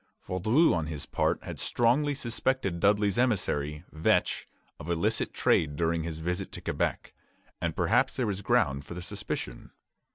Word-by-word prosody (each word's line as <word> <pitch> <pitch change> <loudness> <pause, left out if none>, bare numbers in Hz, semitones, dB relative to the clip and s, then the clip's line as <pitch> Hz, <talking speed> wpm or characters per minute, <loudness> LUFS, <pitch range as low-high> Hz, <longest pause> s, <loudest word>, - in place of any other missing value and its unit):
Vaudreuil 110 - +3
on 80 -3 -1
his 75 -3 -4
part - - 0
had - - -7
strongly 140 +5 +2
suspected 120 -6 -1
Dudley's 105 +2 +3
emissary, 75 - 0
Vetch, 80 +1 +1 0.3
of 75 - -8
illicit 85 -1 0
trade 75 -2 +2
during 85 +1 0
his 80 -1 -5
visit 90 +3 -2
to - - -5
Quebec; - - -2 0.5
and 85 -2 -1
perhaps 120 +9 +2
there 130 - 0
was 100 -2 -2
ground 70 -7 +2
for 85 - -9
the 90 - -6
suspicion. - - -5
90 Hz, 155 wpm, -29 LUFS, 80-115 Hz, 0.5 s, Vaudreuil